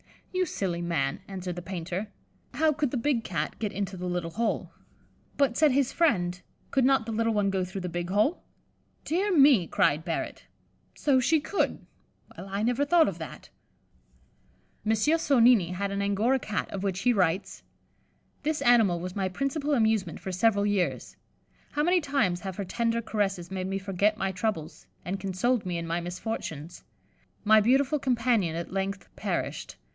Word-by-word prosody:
"You 370 Hz, 0 st, +1 dB
silly 175 Hz, -, -2 dB
man," 155 Hz, -6 st, -1 dB
answered 185 Hz, -2 st, -5 dB
the 175 Hz, -, -5 dB
painter, 185 Hz, +2 st, -4 dB, 0.5 s
"how 310 Hz, +3 st, +3 dB
could 295 Hz, -1 st, 0 dB
the 260 Hz, -, -2 dB
big 240 Hz, -1 st, 0 dB
Cat 155 Hz, -4 st, -3 dB
get 210 Hz, -3 st, -2 dB
into 195 Hz, -1 st, -3 dB
the 180 Hz, 0 st, -5 dB
little 175 Hz, -1 st, -2 dB
hole?" 230 Hz, +4 st, -1 dB, 0.7 s
"But," 275 Hz, -4 st, +2 dB
said 305 Hz, -2 st, +5 dB
his 270 Hz, -1 st, +1 dB
friend, 180 Hz, -, +1 dB, 0.3 s
"could 265 Hz, -2 st, +3 dB
not 270 Hz, -4 st, +3 dB
the 225 Hz, -, -4 dB
little 225 Hz, +1 st, +1 dB
one 205 Hz, -2 st, +1 dB
go 190 Hz, -1 st, 0 dB
through 185 Hz, +1 st, -5 dB
the 180 Hz, -, -4 dB
big 175 Hz, +1 st, -4 dB
hole?" 215 Hz, -, +2 dB, 0.6 s
"Dear 365 Hz, +3 st, +1 dB
me," 270 Hz, -, +6 dB
cried 155 Hz, 0 st, +2 dB
Barrett, 165 Hz, -1 st, -4 dB, 0.5 s
"so 275 Hz, -3 st, +3 dB
she 315 Hz, +5 st, +3 dB
could; 390 Hz, +7 st, -1 dB, 0.5 s
well, -, -, -9 dB
I 200 Hz, +2 st, -2 dB
never 245 Hz, +4 st, +1 dB
thought 330 Hz, +1 st, +5 dB
of -, -, -8 dB
that." -, -, -9 dB, 1.3 s
M. 220 Hz, -, +2 dB
Sonnini 235 Hz, -, +4 dB
had 200 Hz, +2 st, -2 dB
an 200 Hz, 0 st, -2 dB
Angora 210 Hz, +7 st, +2 dB
Cat, 215 Hz, -4 st, -3 dB
of 195 Hz, -, -4 dB
which 190 Hz, -1 st, -2 dB
he 245 Hz, -, +3 dB
writes: 185 Hz, -2 st, 0 dB, 0.8 s
"This 305 Hz, 0 st, -1 dB
animal 225 Hz, -8 st, +4 dB
was 180 Hz, +1 st, -6 dB
my 190 Hz, -2 st, 0 dB
principal 280 Hz, -, -1 dB
amusement 220 Hz, -, +1 dB
for 190 Hz, -, -5 dB
several 200 Hz, +2 st, +2 dB
years. 205 Hz, -3 st, -1 dB, 0.6 s
How 295 Hz, -, +1 dB
many 355 Hz, +2 st, +3 dB
times 275 Hz, -, +1 dB
have 190 Hz, 0 st, -6 dB
her 200 Hz, -, -4 dB
tender 230 Hz, +3 st, 0 dB
caresses 195 Hz, -5 st, -2 dB
made 185 Hz, -1 st, -3 dB
me 195 Hz, 0 st, -2 dB
forget 200 Hz, +2 st, 0 dB
my 195 Hz, -2 st, -1 dB
troubles, 180 Hz, -5 st, -4 dB, 0.2 s
and 190 Hz, +3 st, -3 dB
consoled 195 Hz, +5 st, 0 dB
me 175 Hz, -1 st, -2 dB
in 170 Hz, -, -4 dB
my 165 Hz, +1 st, -1 dB
misfortunes. 175 Hz, -3 st, -5 dB, 0.6 s
My 215 Hz, 0 st, +6 dB
beautiful 270 Hz, +6 st, +3 dB
companion 235 Hz, -9 st, +1 dB
at 170 Hz, +2 st, -5 dB
length 195 Hz, 0 st, -3 dB
perished. -, -, -3 dB
205 Hz, 170 wpm, -28 LUFS, 180-250 Hz, 1.3 s, me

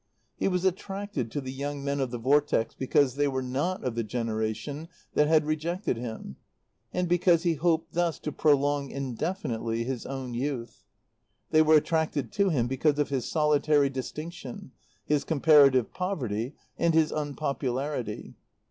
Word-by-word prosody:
He -, -, 0 dB
was 180 Hz, -1 st, 0 dB
attracted 195 Hz, -, -2 dB
to 145 Hz, +6 st, -3 dB
the 130 Hz, -1 st, -6 dB
young 140 Hz, +1 st, -4 dB
men 140 Hz, 0 st, -1 dB
of 135 Hz, -2 st, 0 dB
the 120 Hz, -, -4 dB
Vortex 135 Hz, -1 st, +2 dB
because 135 Hz, 0 st, +1 dB
they 145 Hz, 0 st, +3 dB
were 130 Hz, -1 st, -1 dB
not 140 Hz, +9 st, -2 dB
of 125 Hz, -, -1 dB
the 115 Hz, 0 st, -1 dB
generation 115 Hz, +7 st, -3 dB, 0.2 s
that 150 Hz, -, +3 dB
had 155 Hz, -1 st, +4 dB
rejected 160 Hz, +3 st, -1 dB
him, 115 Hz, -, -7 dB, 0.5 s
and 180 Hz, 0 st, -1 dB
because 175 Hz, -1 st, +3 dB
he 170 Hz, -2 st, +2 dB
hoped 165 Hz, +1 st, 0 dB
thus 170 Hz, -1 st, +1 dB
to 150 Hz, -, -3 dB
prolong 145 Hz, -1 st, +2 dB
indefinitely 120 Hz, -, -3 dB
his 125 Hz, -1 st, -4 dB
own 130 Hz, -2 st, -5 dB
youth. 125 Hz, -1 st, -4 dB, 0.7 s
They 155 Hz, -, +6 dB
were 155 Hz, 0 st, +6 dB
attracted 155 Hz, -2 st, +1 dB
to 200 Hz, -1 st, +2 dB
him 130 Hz, -9 st, +1 dB
because 140 Hz, +4 st, +1 dB
of 145 Hz, -, +1 dB
his 135 Hz, -3 st, -2 dB
solitary 150 Hz, -2 st, +3 dB
distinction, 150 Hz, +1 st, -7 dB, 0.3 s
his 150 Hz, -1 st, +1 dB
comparative 140 Hz, -5 st, +5 dB
poverty, 130 Hz, -, -2 dB, 0.2 s
and 165 Hz, -1 st, +2 dB
his 160 Hz, -1 st, +4 dB
unpopularity. 140 Hz, -5 st, -3 dB
145 Hz, 155 wpm, -28 LUFS, 130-160 Hz, 0.7 s, They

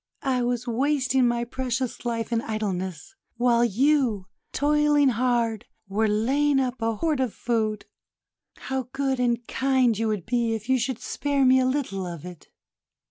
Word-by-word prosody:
I 260 Hz, -3 st, +1 dB
was 245 Hz, 0 st, -1 dB
wasting 260 Hz, +1 st, +1 dB
my 240 Hz, 0 st, 0 dB
precious 255 Hz, 0 st, -3 dB
life 230 Hz, -1 st, -2 dB
in 230 Hz, -1 st, +1 dB
idleness, 190 Hz, -4 st, -4 dB, 0.2 s
while 240 Hz, -1 st, +3 dB
you, 240 Hz, -3 st, +2 dB, 0.3 s
toiling 295 Hz, -1 st, +3 dB
hard, 235 Hz, -2 st, 0 dB, 0.2 s
were 215 Hz, +3 st, +1 dB
laying 270 Hz, +7 st, +2 dB
up 255 Hz, -2 st, -2 dB
a 225 Hz, 0 st, 0 dB
hoard 310 Hz, +3 st, 0 dB
of 255 Hz, -5 st, -1 dB
food. 220 Hz, -3 st, -1 dB, 0.7 s
How 265 Hz, -1 st, -4 dB
good 270 Hz, -1 st, -1 dB
and 240 Hz, -1 st, 0 dB
kind 260 Hz, -3 st, +2 dB
you 225 Hz, +2 st, -1 dB
would 210 Hz, -5 st, -2 dB
be 235 Hz, -1 st, 0 dB
if 220 Hz, 0 st, -7 dB
you 260 Hz, -1 st, +3 dB
should 245 Hz, 0 st, -2 dB
spare 280 Hz, +1 st, -1 dB
me 260 Hz, 0 st, +6 dB
a 255 Hz, -, +2 dB
little 250 Hz, -9 st, -2 dB
of 170 Hz, -2 st, -7 dB
it!" 180 Hz, -3 st, -11 dB
240 Hz, 160 wpm, -25 LUFS, 225-265 Hz, 0.7 s, me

